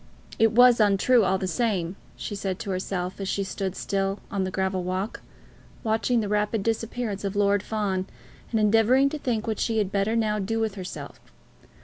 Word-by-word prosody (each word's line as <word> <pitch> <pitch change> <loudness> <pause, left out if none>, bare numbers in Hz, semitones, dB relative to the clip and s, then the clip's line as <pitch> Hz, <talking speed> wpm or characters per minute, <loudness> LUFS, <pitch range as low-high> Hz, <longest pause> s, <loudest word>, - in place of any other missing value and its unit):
"It 225 0 +4
was 245 0 +7
untrue 215 +3 +4
all 190 0 +2
the 190 - -3
same," 185 -3 -1 0.2
she 140 +10 -6
said 195 -2 -3
to 195 - -5
herself, 185 0 -3
as 195 - -3
she 200 - 0
stood 190 -1 -3
still 195 0 -1
on 195 -3 0
the - - -2
gravel 190 0 -1
walk, 185 +4 -3 0.6
watching 225 +2 +1
the 210 - -2
rapid 210 0 0
disappearance 225 -2 -2
of 200 0 -3
Lord 205 0 +3
Fawn, 200 -3 -2 0.4
and 225 - 0
endeavouring 225 +6 +4
to 305 - -5
think 230 -5 -1
what 220 -2 -2
she 225 -1 0
had 205 -3 0
better 205 +3 +1
now 215 -2 +1
do 225 +3 -1
with 220 -2 0
herself. 185 -2 -7
205 Hz, 190 wpm, -26 LUFS, 190-225 Hz, 0.6 s, was